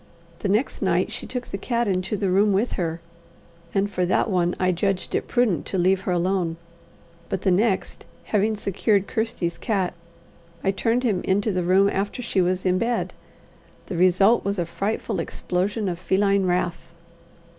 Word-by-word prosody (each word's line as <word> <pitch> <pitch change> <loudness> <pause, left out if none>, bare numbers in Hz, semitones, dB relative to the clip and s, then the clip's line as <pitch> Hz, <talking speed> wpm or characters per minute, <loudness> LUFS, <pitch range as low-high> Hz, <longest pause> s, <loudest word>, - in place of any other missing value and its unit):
The 200 - -2
next 215 +7 0
night 185 +1 +1
she 235 - -4
took 250 -1 -4
the 195 - -4
cat 235 +1 0
into 190 +2 -1
the 195 -2 0
room 200 +2 +4
with 210 +6 +1
her, 165 -2 -2 0.7
and 195 0 +1
for 190 -3 -2
that 195 +4 +1
one 175 -1 +1
I 185 0 +3
judged 185 +1 -1
it - - -1
prudent 240 -8 +1
to 190 - -1
leave 185 +1 +3
her - - +2
alone, 175 -1 0 0.7
but 190 - -3
the 190 - +3
next, 195 +1 0 0.2
having 215 +1 +1
secured 200 0 +1
Kirsty's 220 -7 -2
cat, 195 -5 0 0.7
I 195 - +3
turned 230 +5 0
him 210 -7 +1
into 205 +3 +1
the 185 -1 0
room 185 +3 +4
after 200 +5 -2
she 195 -5 +1
was 185 +1 0
in 185 0 +2
bed: 235 +2 -1 0.7
the - - -5
result 185 +6 +4
was 200 +1 -1
a 175 - 0
frightful 180 +6 -2
explosion 200 +4 -2
of 175 -2 -3
feline 195 +1 +2
wrath. 175 -1 -2
195 Hz, 175 wpm, -24 LUFS, 180-210 Hz, 0.7 s, room